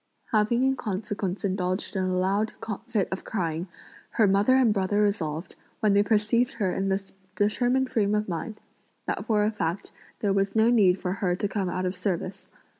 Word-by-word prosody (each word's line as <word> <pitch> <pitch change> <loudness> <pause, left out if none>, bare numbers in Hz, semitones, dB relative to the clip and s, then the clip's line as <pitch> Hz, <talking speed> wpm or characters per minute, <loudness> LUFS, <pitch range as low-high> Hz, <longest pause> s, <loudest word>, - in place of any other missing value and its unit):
Having 220 +3 +2
in 265 0 +3
consequence 200 -2 -3
indulged 185 +1 -2
in 190 -1 0
a 185 0 0
loud 200 +4 +1 0.3
fit 215 -6 0
of 190 - -4
crying, 170 -3 -2 0.5
her 220 - +4
mother 200 +6 +4
and 250 -5 +4
brother 200 +1 0
resolved, 175 -6 -1 0.3
when 215 -3 +3
they 200 - +5
perceived 215 +3 +2
her 200 -6 -1
in 195 0 -1
this 195 0 -2 0.2
determined 245 +5 +2
frame 210 -3 +2
of 210 0 0
mind, 190 +5 -4 0.5
that - - -2
for 210 -2 +3
a 215 - +1
fact 175 -3 -3 0.3
there 200 -2 +2
was 195 +1 0
no 220 +2 +5
need 195 -6 +4
for 180 - -2
her 185 -2 0
to 205 - -1
come 195 -2 -2
out 185 +1 -2
of 180 +1 -2
service. 180 0 -3
200 Hz, 190 wpm, -26 LUFS, 185-215 Hz, 0.5 s, they